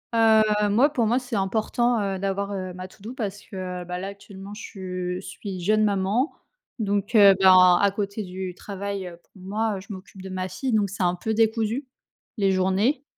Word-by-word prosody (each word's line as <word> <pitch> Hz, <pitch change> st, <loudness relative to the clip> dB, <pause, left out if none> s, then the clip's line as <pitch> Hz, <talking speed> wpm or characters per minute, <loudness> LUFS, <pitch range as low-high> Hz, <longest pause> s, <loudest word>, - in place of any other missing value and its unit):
Heu, 225 Hz, -1 st, +6 dB, 0.3 s
moi, 250 Hz, +8 st, +4 dB
pour 245 Hz, -6 st, +1 dB
moi, 240 Hz, +4 st, +2 dB
c'est 250 Hz, -2 st, -5 dB
important, 220 Hz, +4 st, +1 dB
heu, 195 Hz, -1 st, -1 dB
d'avoir, 200 Hz, +1 st, -2 dB
heu, 185 Hz, -2 st, -4 dB
ma 185 Hz, +1 st, -7 dB
to-do 215 Hz, +5 st, -10 dB
parce 205 Hz, -5 st, -4 dB
que, -, -, -12 dB, 0.3 s
heu, -, -, -13 dB
bah, 180 Hz, 0 st, -4 dB
là 190 Hz, -, -4 dB
actuellement 200 Hz, 0 st, -10 dB
je 185 Hz, -4 st, -5 dB
suis 195 Hz, -1 st, -7 dB
jeune 215 Hz, +4 st, +3 dB
maman 205 Hz, -, +1 dB, 0.5 s
donc 205 Hz, 0 st, -1 dB
heu, 200 Hz, -3 st, +8 dB
ben, 185 Hz, -2 st, +7 dB
à 200 Hz, -1 st, +3 dB
côté 200 Hz, +1 st, -3 dB
du 185 Hz, -1 st, -6 dB
travail, 200 Hz, -1 st, -5 dB
heu, 170 Hz, -1 st, -10 dB
pour -, -, -39 dB
moi, 210 Hz, +1 st, -1 dB
je 190 Hz, -, -13 dB
m'occupe 190 Hz, 0 st, -11 dB
de 190 Hz, -, -7 dB
ma 185 Hz, 0 st, -3 dB
fille 250 Hz, +7 st, -3 dB
donc 205 Hz, -2 st, +2 dB
c'est 195 Hz, 0 st, -3 dB
un 175 Hz, -, +2 dB
peu 220 Hz, +5 st, -2 dB
décousu, 225 Hz, +3 st, +1 dB, 0.5 s
les 195 Hz, -2 st, +2 dB
journées. 190 Hz, +9 st, +1 dB
200 Hz, 195 wpm, -24 LUFS, 190-220 Hz, 0.5 s, heu